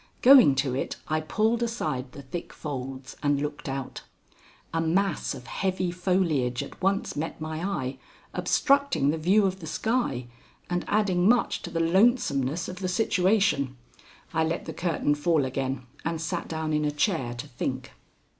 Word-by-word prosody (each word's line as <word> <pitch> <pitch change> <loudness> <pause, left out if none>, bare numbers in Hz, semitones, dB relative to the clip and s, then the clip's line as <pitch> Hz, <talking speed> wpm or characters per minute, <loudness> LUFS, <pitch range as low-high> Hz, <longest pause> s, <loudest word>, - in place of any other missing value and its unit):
Going 250 - +8
to 135 -1 0
it, 135 - -2
I 155 0 +1
pulled 220 +9 +1
aside 135 - -2
the 140 - -9
thick 170 +6 -6
folds 135 -3 -6
and 145 -1 +2
looked 145 0 -4
out. 135 -1 -5 0.7
A 165 - +1
mass 185 +5 0
of 125 - -10
heavy 185 +4 -1
foliage 175 -9 +1
at - - -12
once 195 +1 0
met 160 +3 -4
my 155 +1 -4
eye, 135 -9 -2 0.3
obstructing 275 - +2
the 160 - -3
view 195 +6 +4
of 190 0 -1
the 160 - -8
sky 190 - -1 0.5
and 175 0 0
adding 195 -3 +2
much 245 0 +2
to - - -6
the 165 - -2
lonesomeness 165 - +2
of 180 - -7
the 185 -1 -2
situation. 185 - +2 0.6
I 160 - +2
let 160 +2 -2
the - - -5
curtain 165 -4 0
fall 150 -1 +2
again 130 0 -3 0.2
and 165 0 -2
sat 165 0 -3
down 160 -1 -2
in 150 0 +1
a 150 - +2
chair 145 - 0
to 120 - -6
think. 130 0 -4
160 Hz, 165 wpm, -27 LUFS, 140-190 Hz, 0.7 s, Going